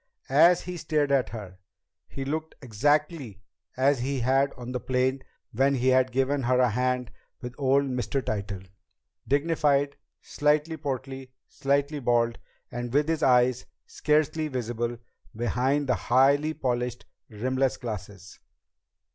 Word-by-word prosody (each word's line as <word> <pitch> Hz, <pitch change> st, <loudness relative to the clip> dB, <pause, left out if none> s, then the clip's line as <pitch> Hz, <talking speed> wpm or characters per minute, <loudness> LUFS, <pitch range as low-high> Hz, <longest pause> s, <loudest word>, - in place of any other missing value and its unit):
As 170 Hz, +5 st, +6 dB
he 180 Hz, 0 st, -6 dB
stared 155 Hz, -3 st, 0 dB
at 135 Hz, -2 st, +2 dB
her, 100 Hz, -5 st, -9 dB, 0.5 s
he 135 Hz, -, -6 dB
looked 155 Hz, +3 st, -4 dB
exactly 140 Hz, -, -1 dB, 0.3 s
as 135 Hz, +1 st, +3 dB
he 130 Hz, +1 st, -2 dB
had 135 Hz, +3 st, +2 dB
on 125 Hz, 0 st, -8 dB
the 125 Hz, -, -2 dB
plane 130 Hz, +2 st, 0 dB, 0.3 s
when 135 Hz, +4 st, +2 dB
he 130 Hz, 0 st, +1 dB
had 130 Hz, 0 st, +3 dB
given 135 Hz, +2 st, +1 dB
her 125 Hz, 0 st, +2 dB
a 125 Hz, -2 st, +3 dB
hand 125 Hz, +1 st, -1 dB, 0.3 s
with 125 Hz, -2 st, -7 dB
old 140 Hz, 0 st, +3 dB
Mr. 130 Hz, 0 st, -2 dB
Tytell 100 Hz, -5 st, -4 dB, 0.6 s
dignified, 145 Hz, -1 st, +1 dB, 0.2 s
slightly 150 Hz, +2 st, 0 dB
portly, 135 Hz, -3 st, -5 dB, 0.2 s
slightly 140 Hz, +1 st, -1 dB
bald, 120 Hz, -2 st, +1 dB, 0.3 s
and 120 Hz, 0 st, -5 dB
with 145 Hz, +3 st, +2 dB
his 160 Hz, -1 st, 0 dB
eyes 125 Hz, -2 st, +3 dB, 0.2 s
scarcely 155 Hz, +1 st, 0 dB
visible 120 Hz, -3 st, -3 dB, 0.4 s
behind 130 Hz, +5 st, 0 dB
the 130 Hz, -, +2 dB
highly 140 Hz, +6 st, +2 dB
polished, 125 Hz, -3 st, -2 dB, 0.2 s
rimless 130 Hz, +4 st, -1 dB
glasses. 100 Hz, -4 st, -8 dB
130 Hz, 130 wpm, -27 LUFS, 120-145 Hz, 0.6 s, As